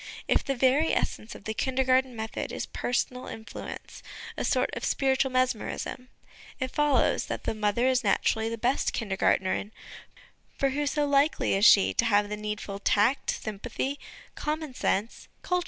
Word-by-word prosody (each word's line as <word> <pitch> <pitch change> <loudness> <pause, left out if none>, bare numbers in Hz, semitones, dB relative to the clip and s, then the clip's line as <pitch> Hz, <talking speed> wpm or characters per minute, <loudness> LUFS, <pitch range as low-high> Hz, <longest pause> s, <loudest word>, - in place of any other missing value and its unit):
If - - +2
the 275 - -1
very 265 +5 +3
essence 215 - -2
of - - -12
the 220 - -3
Kindergarten 260 +1 +1
method 220 0 -4
is - - -4
personal 250 +1 -2
influence, 220 0 -8 0.3
a - - -3
sort - - +1
of - - -5
spiritual 265 0 +1
mesmerism, 255 0 -1 0.5
it 260 -1 -2
follows 295 -2 +2
that - - -4
the - - -1
mother 215 +2 0
is 260 -1 +2
naturally 220 +2 +1
the 230 - -4
best 250 +4 0
Kindergartnerin; 195 -1 0 0.9
for 275 -1 +1
who 290 +2 -1
so 295 +1 +1
likely 285 -2 +2
as 195 +2 +3
she 200 - +7
to 235 - +1
have 205 -2 +3
the 210 - -2
needful 210 -1 -5
tact, 210 +7 +2
sympathy, 220 +6 -3 0.3
common 305 -2 -3
sense, 215 -2 -1 0.2
culture? 360 -1 +1
250 Hz, 155 wpm, -28 LUFS, 215-270 Hz, 0.9 s, she